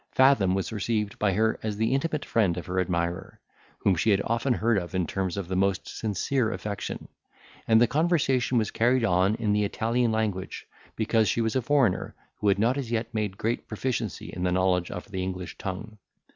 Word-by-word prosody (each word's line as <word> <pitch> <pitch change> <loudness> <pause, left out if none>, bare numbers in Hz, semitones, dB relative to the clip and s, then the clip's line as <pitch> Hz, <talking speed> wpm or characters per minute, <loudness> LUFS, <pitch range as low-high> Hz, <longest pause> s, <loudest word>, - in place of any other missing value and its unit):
Fathom 120 -9 +5
was 95 +2 -2
received 105 0 -2
by 100 -2 +2
her 110 +3 +1
as 105 -2 -3
the 110 +3 +1
intimate 150 +2 -1
friend 95 -7 +1
of 90 - -5
her 95 +1 -1
admirer, 85 0 -2 0.4
whom 100 - +3
she 95 +7 +1
had 100 -1 +4
often 115 +3 0
heard 115 -2 +2
of 90 0 -7
in 90 -2 +1
terms 95 +2 -2
of 100 -3 -3
the 95 - -2
most 95 0 +1
sincere 110 +3 -1
affection; 105 -3 -5 0.6
and 110 0 +6
the 120 - +6
conversation 135 -3 +1
was 110 -3 +1
carried 120 +1 +2
on 95 +1 +3
in 105 -2 0
the 105 0 +2
Italian 115 +3 0
language, 105 -4 -2 0.3
because 110 0 +2
she - - 0
was 115 -1 0
a 130 - +2
foreigner 130 -6 +1 0.2
who 105 - 0
had 100 - +4
not 120 +6 +2
as 130 -4 -4
yet 115 0 -2
made 105 -3 -2
great 115 +3 -2
proficiency 120 +2 -3
in 90 - -5
the 90 0 +1
knowledge 90 -1 +1
of 90 +3 -7
the 95 -2 -3
English 95 -2 -4
tongue. 105 +3 -6
105 Hz, 200 wpm, -27 LUFS, 95-115 Hz, 0.6 s, and